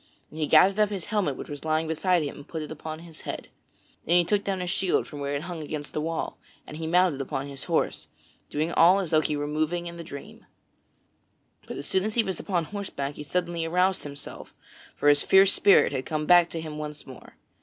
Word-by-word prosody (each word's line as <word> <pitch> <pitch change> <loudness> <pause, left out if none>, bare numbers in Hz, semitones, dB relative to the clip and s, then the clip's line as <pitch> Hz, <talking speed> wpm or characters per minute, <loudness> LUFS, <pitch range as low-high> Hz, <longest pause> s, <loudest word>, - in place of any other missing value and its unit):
And 155 - -9
he 155 - 0
gathered 190 +7 +5
up 210 -1 +4
his 195 -4 -4
helmet 185 -11 +1
which - - -7
was 145 -1 -7
lying 160 0 0
beside 170 +2 +1
him 145 - -5
and 145 - -12
put 160 -2 -4
it 150 - -8
upon 155 +1 -7
his 170 -2 -11
head. - - -6 0.5
Then 170 - +2
he 175 -1 +5
took 205 +3 +1
down 195 -1 -2
his 180 -1 -2
shield 190 -1 +1
from 145 - -9
where 140 0 -2
it 140 - -3
hung 170 -2 -6
against 150 -1 -6
the 150 - -1
wall 165 +1 -3 0.3
and 150 - -9
he 160 0 -4
mounted 175 -4 +3
upon 135 0 -3
his 140 -1 -7
horse, - - -1 0.4
doing 155 +3 -1
all 175 +4 +6
as 190 -5 -2
though 155 - +5
he 150 -1 -1
were 145 - -2
moving 155 +4 -1
in 170 0 -7
a - - -5
dream. 140 -4 -10 1.2
But - - -6
as 140 - -6
soon 190 +3 +1
as 215 +1 -2
he 235 - +4
was 190 -4 -4
upon 180 -4 -1
horseback 155 -6 -5
he - - -9
suddenly 170 +3 -2
aroused 180 +3 +2
himself, 140 -1 -9 0.4
for - - 0
his 145 0 +6
fierce 195 0 +5
spirit 200 - +5
had 130 -2 -3
come 155 -1 -2
back 175 +1 +6
to 165 - -5
him 155 -1 -6
once 150 -1 -7
more. 130 - -13
160 Hz, 235 wpm, -26 LUFS, 150-180 Hz, 1.2 s, all